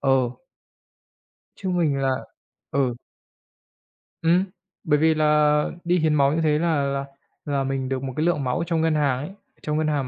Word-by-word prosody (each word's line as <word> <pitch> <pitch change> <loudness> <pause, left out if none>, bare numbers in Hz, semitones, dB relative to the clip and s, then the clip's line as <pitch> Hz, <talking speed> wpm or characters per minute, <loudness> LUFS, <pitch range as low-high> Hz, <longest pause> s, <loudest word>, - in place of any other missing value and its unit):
ờ. 135 -3 +2 1.3
Chứ 190 - -4
mình 165 -6 +1
là 135 -1 +1 0.6
Ừ. 130 -3 +1 1.3
Ừm. 170 +3 +4 0.4
Bởi 150 -2 +2
vì 160 0 +4
là 150 -1 +3 0.2
đi 175 +1 +2
hiến 155 -1 +2
máu 140 -1 +3
như 165 - 0
thế 150 -1 +2
là 160 -4 +1
là 140 0 -1 0.4
là 140 -2 0
mình 135 -1 -2
được 135 0 -2
một 130 -1 -4
cái 155 - +1
lượng 165 -5 +1
máu 125 +4 -1
trong 165 -2 +1
ngân 160 -1 +2
hàng 140 -4 +2
ấy, 145 - -5 0.3
trong 150 0 -2
ngân 155 0 +1
hàng 145 -3 0
150 Hz, 180 wpm, -24 LUFS, 135-160 Hz, 1.3 s, Ừm